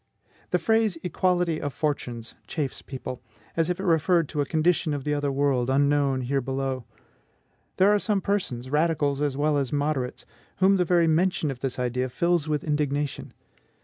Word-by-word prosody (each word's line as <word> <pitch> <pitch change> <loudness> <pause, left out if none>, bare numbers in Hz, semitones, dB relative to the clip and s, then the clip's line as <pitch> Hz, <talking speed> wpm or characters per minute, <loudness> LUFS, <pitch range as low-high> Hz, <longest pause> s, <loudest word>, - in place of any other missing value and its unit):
The - - +2
phrase 220 -5 +2
EQUALITY 180 -2 +1
OF 145 - -2
FORTUNES 120 -7 -3
chafes 145 -4 -3
people, 130 -2 -7 0.3
as 165 0 +1
if 180 - -1
it - - -3
referred 165 -1 +3
to 150 - -1
a 140 - -2
condition 160 -1 +1
of 140 - -5
the 150 - 0
other 145 -1 0
world, 135 -3 +1
unknown 140 -1 +2
here 135 +2 0
below. 135 -1 -3 0.9
There 200 +2 +5
are 210 - +3
some 205 -1 +1
persons, 135 -12 -2
radicals 150 -2 +1
as 145 -2 0
well 150 0 +2
as 135 -3 -2
moderates, 145 -3 -1 0.3
whom 195 +1 +4
the 180 - +2
very 175 -1 +3
mention 165 -1 +1
of 130 - -8
this 130 -1 -3
idea 125 +1 -1
fills 170 +3 +1
with 150 -2 -1
indignation. 145 -2 -1
145 Hz, 175 wpm, -26 LUFS, 135-170 Hz, 0.9 s, There